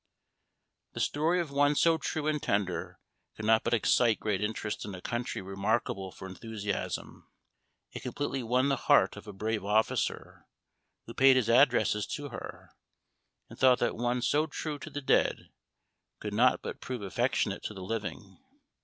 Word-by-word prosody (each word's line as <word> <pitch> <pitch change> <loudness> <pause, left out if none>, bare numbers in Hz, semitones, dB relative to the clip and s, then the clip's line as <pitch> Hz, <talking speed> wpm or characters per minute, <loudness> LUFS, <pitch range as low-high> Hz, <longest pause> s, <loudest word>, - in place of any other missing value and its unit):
The - - -6
story 160 +5 +1
of 165 -5 -3
one 145 +1 +3
so 165 +2 +3
true 155 -1 -3
and 155 -1 0
tender 100 -3 -1 0.4
could 110 - -6
not 110 0 +4
but - - +2
excite 115 0 +3
great 105 -3 -1
interest 105 0 -3
in 100 -2 -6
a - - -8
country 120 +1 -3
remarkable 95 0 -1
for 95 - -9
enthusiasm. 105 +1 -5 0.6
It - - -7
completely 135 -2 -3
won 125 +3 +1
the 135 - +1
heart - - +5
of - - -11
a - - -6
brave 105 +1 -2
officer, 105 +2 -1 0.6
who 115 - -9
paid 135 +1 +6
his 120 -3 +2
addresses 120 -4 +4
to 145 -1 -6
her, - - -9 0.8
and - - -13
thought 130 -1 +6
that 120 - 0
one 120 +1 -1
so 150 +4 +2
true 150 -3 -5
to 155 - -8
the 145 0 -5
dead, 135 - +1 0.7
could 105 -1 -5
not 125 +4 +3
but - - -6
prove 125 -4 -5
affectionate 95 - 0
to 105 - -5
the 95 - -7
living. 110 +2 -5
120 Hz, 165 wpm, -30 LUFS, 105-140 Hz, 0.8 s, paid